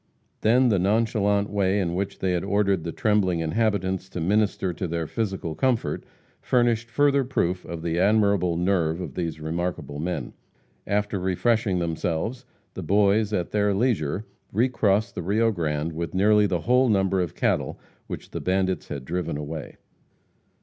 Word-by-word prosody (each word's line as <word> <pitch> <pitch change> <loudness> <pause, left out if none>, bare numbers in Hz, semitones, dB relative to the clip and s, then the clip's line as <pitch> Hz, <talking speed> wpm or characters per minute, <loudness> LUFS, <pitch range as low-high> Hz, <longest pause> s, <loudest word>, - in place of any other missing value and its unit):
Then, 125 +3 +4
the 100 -4 +2
nonchalant 105 0 +1
way 100 -1 +1
in 85 -3 -1
which 95 +2 -3
they 95 -1 0
ordered 100 -1 +1
the 85 - -3
trembling 100 -4 +1
inhabitants 95 +2 0
to - - -5
minister 95 0 +1
to 90 - -4
their 85 0 -2
physical 95 -4 -3
comfort, 125 +4 0 0.4
furnished 120 -2 +1
another 140 -1 +4
proof 90 -8 -1
of 85 -1 -6
the 85 0 -1
admirable 100 -3 +3
nerve 85 -2 +1
of 85 -7 -6
these 85 -1 -3
remarkable 80 -2 -3
men. 80 -5 -3 0.5
After 105 -1 0
refreshing 95 +2 +1
themselves, 85 +8 -2 0.3
the - - -6
Boys, 100 +4 +2
at 90 -5 -1
their 105 -1 +2
leisure, 100 - 0 0.3
recrossed 110 -2 +1
the - - -4
Rio 110 +6 +2
Grande 80 -4 -2
with 85 +2 -4
nearly 105 +2 +4
the 90 -3 -1
whole 125 +4 +3
number 95 -2 +2
of 85 -4 -3
cattle - - 0 0.3
which - - -7
the - - -4
bandits 95 0 0
had 70 -3 -6
driven 85 -2 -2
away. 75 -1 -6
95 Hz, 155 wpm, -25 LUFS, 85-105 Hz, 0.5 s, Then